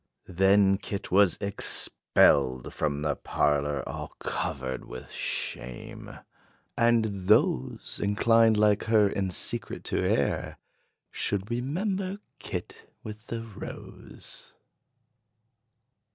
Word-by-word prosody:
Then 95 Hz, +1 st, +4 dB
kit 100 Hz, -, -6 dB
was 95 Hz, -1 st, +4 dB
expelled 70 Hz, -9 st, +2 dB
from 75 Hz, 0 st, -1 dB
the 75 Hz, -2 st, 0 dB
parlor 75 Hz, -2 st, 0 dB
All -, -, -7 dB
covered 65 Hz, -2 st, -3 dB
with 65 Hz, -, -10 dB
shame. 65 Hz, -1 st, -5 dB, 0.6 s
And 110 Hz, -5 st, +1 dB
those 80 Hz, -11 st, +2 dB
Inclined, 115 Hz, +2 st, +4 dB
like 105 Hz, -1 st, +3 dB
her, 110 Hz, -2 st, +4 dB
in 100 Hz, -1 st, -1 dB
secret 90 Hz, -, -2 dB
to -, -, -2 dB
err, -, -, 0 dB, 0.5 s
Should 100 Hz, +2 st, -2 dB
remember 185 Hz, -, -2 dB, 0.2 s
kit -, -, -7 dB
with 110 Hz, +1 st, -9 dB
the 115 Hz, -1 st, -4 dB
rose. 110 Hz, -4 st, -11 dB
100 Hz, 95 wpm, -28 LUFS, 75-110 Hz, 0.6 s, Then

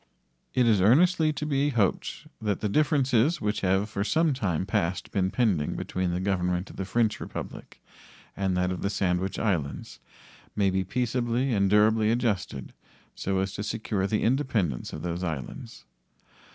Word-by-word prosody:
It 125 Hz, -, +4 dB
is 110 Hz, -5 st, +4 dB
earnestly 155 Hz, -, +4 dB
to 150 Hz, +1 st, -4 dB
be 145 Hz, -1 st, +1 dB
hoped 110 Hz, -8 st, -1 dB, 0.2 s
that 105 Hz, -3 st, -1 dB
the 110 Hz, -, 0 dB
differences 140 Hz, +2 st, +2 dB
which 105 Hz, 0 st, -1 dB
have 95 Hz, +2 st, +2 dB
for 100 Hz, -2 st, -2 dB
some 160 Hz, +6 st, +2 dB
time 95 Hz, -, -1 dB
past 95 Hz, -3 st, -1 dB
been 95 Hz, -2 st, +1 dB
pending 100 Hz, -8 st, +1 dB
between 90 Hz, -1 st, -2 dB
the 85 Hz, +1 st, -1 dB
Government 90 Hz, -1 st, -1 dB
of -, -, -14 dB
the 95 Hz, -, -3 dB
French 110 Hz, +2 st, +1 dB
Republic -, -, -8 dB, 0.6 s
and 95 Hz, -2 st, 0 dB
that 90 Hz, 0 st, +1 dB
of 90 Hz, -, -4 dB
the 100 Hz, -, 0 dB
Sandwich 95 Hz, -1 st, -1 dB
Islands 85 Hz, -10 st, -2 dB, 0.6 s
may 100 Hz, -2 st, +2 dB
be 95 Hz, 0 st, 0 dB
peaceably 120 Hz, +4 st, 0 dB
and 100 Hz, -2 st, +2 dB
durably 105 Hz, +1 st, +4 dB
adjusted 105 Hz, -, -1 dB, 0.4 s
so 95 Hz, 0 st, -2 dB
as 95 Hz, 0 st, -3 dB
to 105 Hz, -, -5 dB
secure 105 Hz, -2 st, -2 dB
the 105 Hz, +1 st, 0 dB
independence 115 Hz, -, 0 dB
of 75 Hz, -, -7 dB
those 90 Hz, +1 st, -3 dB
islands. 75 Hz, -6 st, -6 dB
105 Hz, 165 wpm, -27 LUFS, 95-120 Hz, 0.6 s, It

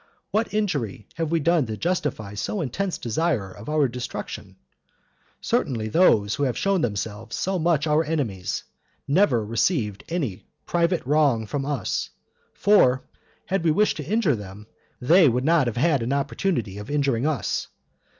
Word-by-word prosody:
What 220 Hz, +1 st, 0 dB
injury 145 Hz, -, -2 dB
have 165 Hz, -2 st, -2 dB
we 165 Hz, 0 st, +2 dB
done 160 Hz, -3 st, +2 dB
to 110 Hz, -1 st, -4 dB
justify 150 Hz, -, -2 dB
so 105 Hz, -, -3 dB
intense 175 Hz, +7 st, -2 dB
desire 120 Hz, -, -1 dB
of 100 Hz, +7 st, -10 dB
our 150 Hz, -2 st, +3 dB
destruction? 125 Hz, 0 st, -6 dB, 0.9 s
Certainly 110 Hz, -4 st, -1 dB
those 105 Hz, -, +4 dB
who -, -, -4 dB
have 125 Hz, -, -1 dB
shown 195 Hz, -3 st, +1 dB
themselves 110 Hz, -1 st, -3 dB
so 190 Hz, -1 st, -1 dB
much 160 Hz, -2 st, +2 dB
our 155 Hz, +1 st, +3 dB
enemies, 130 Hz, -, -2 dB, 0.4 s
never 140 Hz, -, +3 dB
received 110 Hz, -, 0 dB
any 140 Hz, -, -2 dB, 0.2 s
private 170 Hz, -1 st, +1 dB
wrong 140 Hz, -5 st, +2 dB
from 140 Hz, +5 st, -3 dB
us; 145 Hz, -3 st, -2 dB, 0.5 s
for, 130 Hz, -11 st, +4 dB, 0.4 s
had 190 Hz, -2 st, -1 dB
we 165 Hz, -, +3 dB
wished 210 Hz, +7 st, +2 dB
to 150 Hz, -, -4 dB
injure 195 Hz, -, +1 dB
them, 105 Hz, 0 st, -9 dB, 0.3 s
they 160 Hz, +5 st, +6 dB
would 125 Hz, +2 st, 0 dB
not 160 Hz, -4 st, +4 dB
have 120 Hz, -, -3 dB
had 145 Hz, 0 st, +2 dB
an 120 Hz, +4 st, -1 dB
opportunity 140 Hz, -, -1 dB
of 105 Hz, -, -9 dB
injuring 140 Hz, -3 st, +1 dB
us. 155 Hz, -3 st, -1 dB
140 Hz, 155 wpm, -24 LUFS, 115-170 Hz, 0.9 s, they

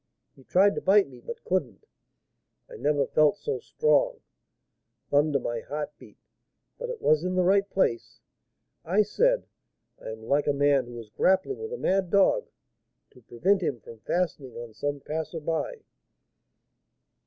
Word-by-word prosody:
He 135 Hz, -, -18 dB
tried 195 Hz, +8 st, +4 dB
to -, -, -4 dB
bite 200 Hz, -1 st, +4 dB
me, 125 Hz, -2 st, -14 dB
but 235 Hz, -, -8 dB
couldn't; 145 Hz, -, -2 dB, 0.8 s
I -, -, -11 dB
never 145 Hz, -1 st, +1 dB
felt 155 Hz, +5 st, +3 dB
so 445 Hz, -, -3 dB
strong. 480 Hz, +1 st, +1 dB, 0.9 s
Thunder! 145 Hz, 0 st, +3 dB
my 120 Hz, -2 st, -3 dB
heart 150 Hz, +5 st, -5 dB
beat, -, -, -16 dB, 0.6 s
but -, -, -5 dB
it 485 Hz, -3 st, -6 dB
was 155 Hz, +1 st, +3 dB
in 185 Hz, 0 st, -1 dB
the 185 Hz, -, +3 dB
right 195 Hz, +2 st, +3 dB
place. 120 Hz, -13 st, -1 dB, 0.6 s
I 190 Hz, +6 st, +3 dB
said, -, -, +1 dB, 0.6 s
'I -, -, -7 dB
am 110 Hz, 0 st, -11 dB
like 140 Hz, +5 st, +1 dB
a 145 Hz, -, +3 dB
man 140 Hz, -2 st, +2 dB
who 120 Hz, 0 st, -9 dB
is 110 Hz, -2 st, -10 dB
grappling 190 Hz, -, +1 dB
with 445 Hz, 0 st, -6 dB
a 485 Hz, -, -4 dB
mad 190 Hz, -, +1 dB
dog, 200 Hz, -, +3 dB, 0.6 s
to 125 Hz, -, -19 dB
prevent 185 Hz, -, +1 dB
him 140 Hz, -8 st, -2 dB
from 115 Hz, +1 st, -13 dB
fastening 150 Hz, -3 st, -2 dB
on 120 Hz, -1 st, -8 dB
some 145 Hz, +4 st, -3 dB
passer 160 Hz, +3 st, -4 dB
by.' 165 Hz, -, -3 dB
165 Hz, 160 wpm, -27 LUFS, 140-200 Hz, 0.9 s, tried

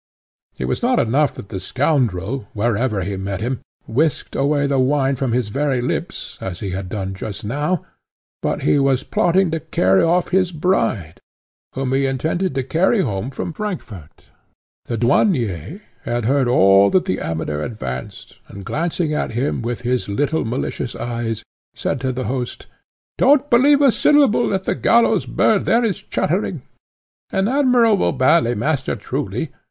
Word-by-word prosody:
It -, -, -3 dB
was -, -, -2 dB
not 245 Hz, +1 st, +2 dB
enough 135 Hz, +5 st, +1 dB
that 100 Hz, -, -10 dB
the 95 Hz, -, -4 dB
scoundrel, 125 Hz, -, -1 dB
wherever 110 Hz, -1 st, 0 dB
he 95 Hz, +2 st, -3 dB
met 95 Hz, 0 st, -4 dB
him, 125 Hz, +4 st, -2 dB, 0.3 s
whisked 145 Hz, +6 st, -1 dB
away 145 Hz, +1 st, +1 dB
the 140 Hz, -1 st, +1 dB
wine 135 Hz, +1 st, +2 dB
from 130 Hz, -1 st, -2 dB
his 120 Hz, -2 st, 0 dB
very 135 Hz, +2 st, 0 dB
lips, 120 Hz, -, -4 dB
as 90 Hz, -2 st, -5 dB
he 100 Hz, -3 st, -4 dB
had 95 Hz, 0 st, -5 dB
done 95 Hz, -1 st, -4 dB
just 100 Hz, +1 st, -7 dB
now, 145 Hz, -, -1 dB, 0.6 s
but -, -, -2 dB
he 145 Hz, -, +3 dB
was 135 Hz, -2 st, +2 dB
plotting 175 Hz, 0 st, +2 dB
to 165 Hz, -, -1 dB
carry 95 Hz, -, +2 dB
off 175 Hz, +1 st, +2 dB
his 185 Hz, -1 st, +2 dB
bride, 115 Hz, -, -1 dB, 0.6 s
whom 130 Hz, 0 st, -1 dB
he 135 Hz, 0 st, +2 dB
intended 160 Hz, +6 st, -1 dB
to 135 Hz, -, 0 dB
carry 185 Hz, -, +2 dB
home 110 Hz, -, -2 dB
from 140 Hz, +5 st, -5 dB
Frankfort. 115 Hz, -, -7 dB, 0.6 s
The 115 Hz, -, -3 dB
Douanier 120 Hz, -, +1 dB, 0.2 s
had 120 Hz, -1 st, -2 dB
heard 135 Hz, +1 st, +2 dB
all 100 Hz, -4 st, +5 dB
that 185 Hz, -1 st, +2 dB
the 190 Hz, -, -1 dB
Amateur 80 Hz, -2 st, -3 dB
advanced, 65 Hz, -, -6 dB
and, 100 Hz, -1 st, -10 dB
glancing 165 Hz, -, -1 dB
at 150 Hz, -, -2 dB
him 125 Hz, +4 st, -1 dB
with 120 Hz, +1 st, -3 dB
his 125 Hz, -2 st, -1 dB
little 145 Hz, +9 st, 0 dB
malicious 120 Hz, +1 st, -3 dB
eyes, 115 Hz, -2 st, -3 dB, 0.3 s
said 135 Hz, -, -2 dB
to 130 Hz, -1 st, 0 dB
the 130 Hz, +1 st, -3 dB
host, 125 Hz, +1 st, -4 dB, 0.5 s
"Don't 285 Hz, +1 st, +4 dB
believe 280 Hz, +4 st, +5 dB
a 270 Hz, -, +6 dB
syllable 280 Hz, -3 st, +3 dB
that 190 Hz, -1 st, -1 dB
the -, -, 0 dB
gallows 230 Hz, -4 st, +3 dB
bird 210 Hz, -3 st, +2 dB
there 235 Hz, +1 st, +3 dB
is 210 Hz, -, -2 dB
chattering. -, -, -2 dB, 0.7 s
An 195 Hz, +1 st, +1 dB
admirable 245 Hz, -6 st, +3 dB
ballet 130 Hz, -1 st, +3 dB
master, 135 Hz, +4 st, -1 dB
truly! -, -, -4 dB
130 Hz, 160 wpm, -20 LUFS, 110-170 Hz, 0.7 s, a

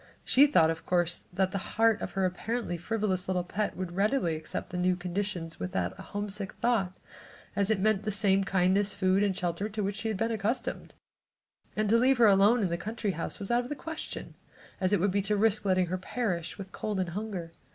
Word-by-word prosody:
She 280 Hz, +3 st, +6 dB
thought, 165 Hz, -, +4 dB
of 165 Hz, -, -6 dB
course, 175 Hz, -1 st, 0 dB
that 190 Hz, +1 st, +1 dB
the 195 Hz, -, -2 dB, 0.2 s
heart 225 Hz, -1 st, +4 dB
of 180 Hz, -, -4 dB
her 195 Hz, -1 st, +1 dB
apparently 220 Hz, +2 st, -2 dB
frivolous 190 Hz, 0 st, -1 dB
little 185 Hz, -1 st, 0 dB
pet 205 Hz, +4 st, -2 dB
would 185 Hz, -2 st, -4 dB
readily 195 Hz, -2 st, +1 dB
accept 155 Hz, 0 st, -5 dB
the 180 Hz, -, -3 dB
new 180 Hz, 0 st, +2 dB
conditions 180 Hz, -1 st, -3 dB
without 90 Hz, 0 st, -2 dB
a -, -, -6 dB
homesick 205 Hz, -1 st, -4 dB
thought, 200 Hz, -7 st, 0 dB, 0.6 s
as 200 Hz, 0 st, +1 dB
it 220 Hz, -3 st, +2 dB
meant 215 Hz, 0 st, +2 dB
the 215 Hz, 0 st, -2 dB
same 195 Hz, -1 st, +3 dB
kindness, 195 Hz, +2 st, +2 dB
food 190 Hz, 0 st, +2 dB
and 200 Hz, -2 st, +1 dB
shelter 180 Hz, +4 st, -2 dB
to 215 Hz, 0 st, -3 dB
which 200 Hz, +1 st, -2 dB
she 225 Hz, -, -3 dB
had 215 Hz, -3 st, -1 dB
been 225 Hz, +3 st, 0 dB
accustomed, 220 Hz, +3 st, -2 dB, 0.8 s
and 215 Hz, 0 st, +1 dB
to 230 Hz, +2 st, +5 dB
leave 260 Hz, +2 st, +4 dB
her 235 Hz, -, +6 dB
alone 205 Hz, +3 st, +5 dB
at 185 Hz, -, +1 dB
the 170 Hz, -, -1 dB
country 215 Hz, +2 st, -2 dB
house 165 Hz, -2 st, -4 dB
was 200 Hz, +3 st, -4 dB
out 240 Hz, +1 st, +3 dB
of 245 Hz, -, -8 dB
the 295 Hz, -, -3 dB
question, 320 Hz, +2 st, -6 dB, 0.5 s
as 185 Hz, 0 st, +1 dB
it 205 Hz, -, +3 dB
would 195 Hz, +2 st, +2 dB
be 200 Hz, +1 st, +1 dB
to 205 Hz, +2 st, +1 dB
risk 215 Hz, 0 st, +2 dB
letting 185 Hz, -1 st, +3 dB
her 185 Hz, +2 st, -3 dB
perish 185 Hz, -5 st, -3 dB
with 195 Hz, -1 st, -8 dB
cold 210 Hz, -1 st, -3 dB
and 185 Hz, -2 st, -1 dB
hunger. 185 Hz, -3 st, -5 dB
195 Hz, 220 wpm, -29 LUFS, 180-215 Hz, 0.8 s, She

